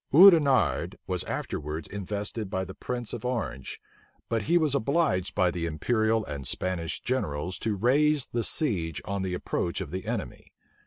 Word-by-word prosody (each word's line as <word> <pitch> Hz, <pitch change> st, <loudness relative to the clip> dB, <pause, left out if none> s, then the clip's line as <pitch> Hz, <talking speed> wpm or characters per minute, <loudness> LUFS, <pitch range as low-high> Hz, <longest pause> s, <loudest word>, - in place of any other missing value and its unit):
Oudenarde 155 Hz, -, +6 dB
was -, -, -2 dB
afterwards 75 Hz, +2 st, -4 dB
invested 105 Hz, +1 st, -4 dB
by 95 Hz, 0 st, -1 dB
the 95 Hz, -, -8 dB
prince 120 Hz, +1 st, -4 dB
of -, -, -5 dB
Orange 115 Hz, -, -3 dB, 0.5 s
but 115 Hz, -1 st, +1 dB
he 170 Hz, +12 st, +3 dB
was 155 Hz, -5 st, +2 dB
obliged 140 Hz, -, +1 dB
by 90 Hz, -3 st, +3 dB
the 85 Hz, -1 st, -2 dB
imperial 110 Hz, +7 st, +1 dB
and 70 Hz, -3 st, -6 dB
Spanish 85 Hz, +2 st, -2 dB
generals 90 Hz, -, -2 dB
to 110 Hz, -2 st, -1 dB
raise 140 Hz, +6 st, +3 dB
the 120 Hz, -1 st, -2 dB
siege 90 Hz, -, +1 dB
on 100 Hz, -1 st, -2 dB
the 95 Hz, -1 st, -2 dB
approach 85 Hz, -1 st, -2 dB
of -, -, -5 dB
the 95 Hz, +1 st, -5 dB
enemy. -, -, -4 dB
105 Hz, 160 wpm, -28 LUFS, 90-125 Hz, 0.5 s, Oudenarde